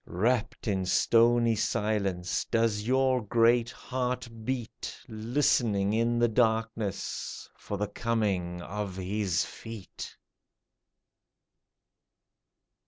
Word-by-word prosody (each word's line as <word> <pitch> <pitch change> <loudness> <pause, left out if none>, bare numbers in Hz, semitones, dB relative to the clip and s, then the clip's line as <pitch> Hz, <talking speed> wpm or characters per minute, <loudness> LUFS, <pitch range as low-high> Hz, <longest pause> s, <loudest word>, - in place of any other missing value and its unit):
Wrapped 115 +5 0
in 95 -3 +1
stony 115 +3 +4
silence, 100 -5 0
does 115 -2 +1
your 130 0 +3
great 115 +2 +3
heart 125 0 -3 0.2
beat, 125 -1 -4
Listening 110 -3 +1
in 115 +1 +2
the 120 0 +4
darkness 110 -3 -1
for 100 - -5
the 105 +1 -1
coming 100 -6 -1
of 105 -1 -4
His 95 -3 0
feet 115 -4 -9
110 Hz, 90 wpm, -29 LUFS, 100-120 Hz, 0.2 s, stony